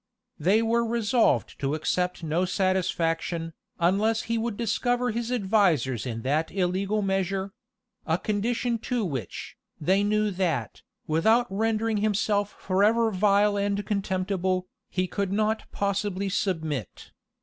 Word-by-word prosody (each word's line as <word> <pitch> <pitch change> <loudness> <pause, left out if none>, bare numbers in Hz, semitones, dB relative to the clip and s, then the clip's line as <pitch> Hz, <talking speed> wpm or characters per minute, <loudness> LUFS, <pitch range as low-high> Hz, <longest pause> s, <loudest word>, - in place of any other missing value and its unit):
[*] - - -46
They 220 +3 +4
were 235 +1 +2
resolved 230 0 +1
to 140 +2 0
accept 180 +3 -1
of 160 - -4
no 170 +4 +2
satisfaction, 170 -3 0 0.3
unless 205 +6 +2
he 230 - -2
would 225 -2 -2
discover 245 +2 0
his 235 +2 -3
advisers 190 - +2
in 115 -2 -4
that 150 +5 0
illegal 195 +3 0
measure; 195 0 -1 0.5
a 160 0 +2
condition 230 +4 -1
to 240 -1 -1
which, 130 - -5 0.2
they 190 +6 +2
knew 210 0 +1
that, 170 - -2 0.2
without 220 +10 +3
rendering 220 +1 0
himself 205 -1 0
forever 215 +4 +2
vile 205 +1 +3
and 200 0 -1
contemptible, 190 -2 -1 0.2
he 185 -1 0
could 195 +1 -2
not 215 +2 0
possibly 200 -1 -1
submit. 160 - -3
200 Hz, 130 wpm, -26 LUFS, 180-215 Hz, 0.5 s, They